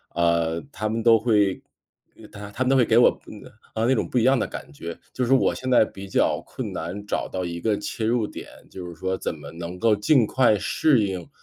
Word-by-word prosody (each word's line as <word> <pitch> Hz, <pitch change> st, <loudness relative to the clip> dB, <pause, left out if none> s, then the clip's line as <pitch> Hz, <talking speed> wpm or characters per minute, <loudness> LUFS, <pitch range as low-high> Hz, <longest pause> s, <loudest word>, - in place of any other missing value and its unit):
呃， 85 Hz, -1 st, +1 dB
他 110 Hz, 0 st, -3 dB
们 115 Hz, 0 st, -2 dB
都 115 Hz, -2 st, +6 dB
会 105 Hz, -4 st, +2 dB, 0.6 s
呃， -, -, -12 dB
他 100 Hz, 0 st, -10 dB
他 130 Hz, -, -2 dB
们 130 Hz, -, 0 dB
都 135 Hz, -, +4 dB
会 125 Hz, -, +5 dB
给 115 Hz, -, +3 dB
我， 120 Hz, -, +5 dB
嗯， 105 Hz, -, -11 dB, 0.3 s
呃， 110 Hz, +1 st, 0 dB
那 130 Hz, -, +3 dB
种 -, -, -2 dB
不 125 Hz, -, -1 dB
一 115 Hz, -, +3 dB
样 130 Hz, +1 st, +4 dB
的 -, -, -1 dB
感 -, -, -9 dB
觉。 85 Hz, +3 st, -7 dB, 0.2 s
就 130 Hz, -, -1 dB
是 130 Hz, -, +3 dB
我 -, -, +2 dB
现 130 Hz, 0 st, -5 dB
在 125 Hz, -3 st, +5 dB
比 100 Hz, -1 st, -10 dB
较 -, -, +1 dB
困 -, -, -6 dB
难， 95 Hz, +5 st, -5 dB
找 -, -, -2 dB
到 90 Hz, -1 st, -3 dB
一 85 Hz, 0 st, -5 dB
个 105 Hz, -2 st, +1 dB
切 110 Hz, +2 st, -4 dB
入 115 Hz, -1 st, +1 dB
点， -, -, -9 dB, 0.2 s
就 90 Hz, -2 st, -8 dB
是 85 Hz, -, -9 dB
说 95 Hz, +2 st, -2 dB
怎 -, -, -3 dB
么 -, -, -10 dB
能 85 Hz, +2 st, -7 dB
够 110 Hz, -2 st, +3 dB
尽 115 Hz, +3 st, +3 dB
快 120 Hz, -3 st, +3 dB
适 110 Hz, +4 st, +2 dB
应， 90 Hz, -3 st, -5 dB
105 Hz, 265 characters per minute, -24 LUFS, 90-120 Hz, 0.6 s, 都